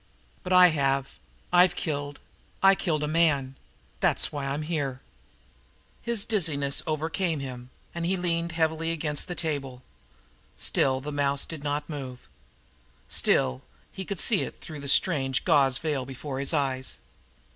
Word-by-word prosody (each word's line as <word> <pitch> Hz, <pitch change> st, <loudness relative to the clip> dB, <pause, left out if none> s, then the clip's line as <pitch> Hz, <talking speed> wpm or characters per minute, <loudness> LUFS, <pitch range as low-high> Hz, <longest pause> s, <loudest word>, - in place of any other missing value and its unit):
But 185 Hz, -, -6 dB
I 180 Hz, -1 st, +8 dB
have 135 Hz, -3 st, -1 dB, 0.3 s
I've 180 Hz, 0 st, +6 dB
killed. 145 Hz, -4 st, -3 dB, 0.4 s
I 195 Hz, 0 st, +8 dB
killed 160 Hz, -5 st, -1 dB
a -, -, 0 dB
man. 150 Hz, -5 st, +2 dB, 0.4 s
That's -, -, +3 dB
why 145 Hz, -2 st, -3 dB
I'm 140 Hz, +3 st, -2 dB
here." 145 Hz, -5 st, -2 dB, 1.0 s
His 235 Hz, -4 st, -1 dB
dizziness 155 Hz, -10 st, +1 dB
almost -, -, -19 dB, 0.2 s
overcame 165 Hz, -1 st, -1 dB
him, 125 Hz, -2 st, -7 dB, 0.2 s
and 170 Hz, -, -4 dB
he 185 Hz, +3 st, +1 dB
leaned 170 Hz, -1 st, -1 dB
heavily 160 Hz, 0 st, 0 dB
against 150 Hz, -2 st, -2 dB
the 175 Hz, -, -4 dB
table. 135 Hz, -6 st, -3 dB, 0.7 s
Still 130 Hz, -1 st, +1 dB
the 145 Hz, -, -5 dB
little 145 Hz, -, -6 dB
mouse 140 Hz, -1 st, +1 dB
did 155 Hz, -3 st, -7 dB
not 145 Hz, 0 st, -2 dB
move. 130 Hz, -, -7 dB, 0.8 s
Still 65 Hz, 0 st, +2 dB, 0.3 s
he 190 Hz, -, -6 dB
could 200 Hz, 0 st, -5 dB
see 215 Hz, -5 st, +2 dB
it -, -, -6 dB
through 155 Hz, -2 st, -8 dB
the 140 Hz, -, -7 dB
strange 135 Hz, -3 st, +2 dB
gauze 135 Hz, -3 st, +4 dB
veil 145 Hz, -3 st, -2 dB
before 135 Hz, 0 st, -6 dB
his 140 Hz, -, +1 dB
eyes. 135 Hz, -4 st, -1 dB
150 Hz, 155 wpm, -27 LUFS, 135-170 Hz, 1.0 s, I